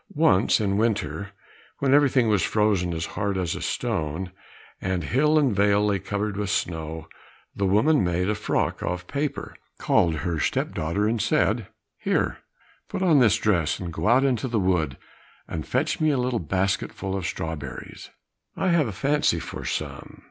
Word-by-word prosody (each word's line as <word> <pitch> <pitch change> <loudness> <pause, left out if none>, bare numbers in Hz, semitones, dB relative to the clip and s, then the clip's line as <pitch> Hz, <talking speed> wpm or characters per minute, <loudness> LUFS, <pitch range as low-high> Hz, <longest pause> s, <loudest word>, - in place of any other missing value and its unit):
Once, 145 - +4
in 100 -2 0
winter, 100 -5 -1 0.5
when 135 -1 +2
everything 135 -4 +4
was 105 -4 +3
frozen 100 -3 +1
as 80 0 -2
hard 100 -2 -1
as 90 -3 -1
a - - -6
stone, 80 +4 -2 0.5
and 90 -2 -1
hill 150 - +2
and 135 -8 +2
vale 100 +1 +3
lay 100 -2 +1
covered 100 +2 -3
with 105 -1 -2
snow, 80 -4 -3 0.5
the 100 - 0
woman 125 +10 +3
made 90 +1 0
a 105 - +2
frock - - -1
of 90 0 -3
paper, 145 +7 -3 0.2
called 85 -2 +2
her 85 0 -2
step - - -1
daughter, 85 +7 0
and 115 0 0
said, - - +1 0.3
"Here, - - 0 0.5
put 185 - -2
on 165 -6 +5
this 115 -5 +5
dress 85 -8 +1
and 85 -3 -5
go - - -2
out 125 +4 +5
into 130 -2 0
the 115 -3 0
wood, 85 -8 0 0.5
and 80 -2 -5
fetch 155 +7 0
me 155 - +4
a 145 - +2
little 125 -1 0
basketful 95 +2 -1
of 95 -3 -2
strawberries,—I 80 - -6
have 170 -6 +3
a - - -3
fancy 140 - +1
for - - -7
some." - - -5
100 Hz, 170 wpm, -25 LUFS, 85-125 Hz, 0.5 s, on